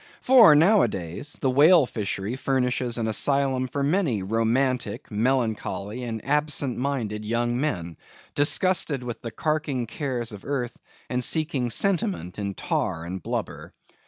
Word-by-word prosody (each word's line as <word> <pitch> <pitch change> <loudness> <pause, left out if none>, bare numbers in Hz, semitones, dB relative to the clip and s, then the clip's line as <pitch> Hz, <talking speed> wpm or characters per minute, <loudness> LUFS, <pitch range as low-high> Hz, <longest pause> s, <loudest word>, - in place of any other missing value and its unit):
For 240 - +7
nowadays, 145 - +1
the 135 - +2
whale 150 +3 +6
fishery 105 -1 -4
furnishes 125 -2 -1
an 115 - -1
asylum 135 +2 +1
for 140 +2 -3
many 145 - 0
romantic, 115 +2 -1
melancholy, 110 -2 -1
and 115 -2 -5
absent 145 -2 0
minded 120 -6 -2
young 120 +2 -1
men, 85 - -3 0.4
disgusted 145 -2 +2
with 120 -1 -6
the 115 - -5
carking 150 -2 -2
cares 120 -2 -3
of 105 -2 -10
earth, 130 -4 -3 0.3
and 125 0 -2
seeking 150 -4 0
sentiment 100 - -1
in 100 -2 -3
tar 80 +1 -2
and 90 +2 -6
blubber. - - -5
125 Hz, 130 wpm, -25 LUFS, 110-145 Hz, 0.4 s, For